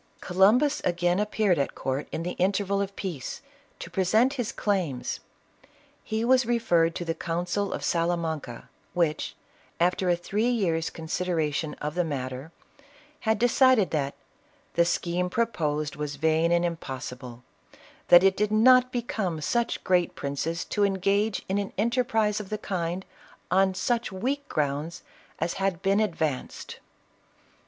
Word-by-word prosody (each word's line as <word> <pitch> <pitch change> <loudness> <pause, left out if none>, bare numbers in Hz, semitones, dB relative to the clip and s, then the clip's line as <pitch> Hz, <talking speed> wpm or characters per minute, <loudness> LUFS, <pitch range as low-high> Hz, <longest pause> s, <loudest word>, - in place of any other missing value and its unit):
Columbus 215 +11 +3
again 175 +1 +1
appeared 210 -4 +1
at 140 - -1
court, 135 +2 -3
in 165 - -3
the 180 - -2
interval 200 +1 +1
of 200 0 -4
peace, 165 -10 -5 0.4
to - - -9
present 215 +8 +3
his 245 -6 -2
claims. 180 -11 -1 0.8
He 220 +1 -2
was 260 +1 +5
referred 175 -9 +2
to 175 - -4
the 165 - -1
council 175 +4 -2
of - - -4
Salamanca, 165 -7 -1 0.3
which, 165 -3 0 0.4
after 180 +1 +2
a 175 - +4
three 210 +7 -1
years' 170 -9 0
con 165 - -9
sideration 160 -3 -1
of 150 0 -3
the 180 +1 +1
matter, 135 -1 -5 0.8
had 220 - +3
decided 245 -2 +4
that 140 -3 -1 0.3
" - - -36
the 170 - +3
scheme 175 +1 0
proposed 155 -9 -1
was 150 0 -4
vain 160 +3 +2
and 175 0 +3
impossible; 130 -6 -6 0.3
and - - -20 0.3
that 175 +1 +8
it 195 0 +4
did 210 +1 0
not 255 +3 +6
become 215 -9 -2
such 235 +9 -1
great 180 -2 +2
princes 155 +5 -3
to 205 - 0
engage 200 +2 +1
in 195 +2 0
an 200 - -4
enterprise 225 -1 +1
of 205 -3 -7
the 215 - -2
kind, 180 -2 -3 0.5
on 190 0 +3
such 235 +4 -1
weak 270 +9 -3
grounds 150 +2 -2 0.3
as 165 +2 -1
had 190 -2 -1
been 195 +2 +3
ad 210 -6 0
' - - -22
vanced." 145 -5 -3
180 Hz, 150 wpm, -27 LUFS, 160-210 Hz, 0.8 s, that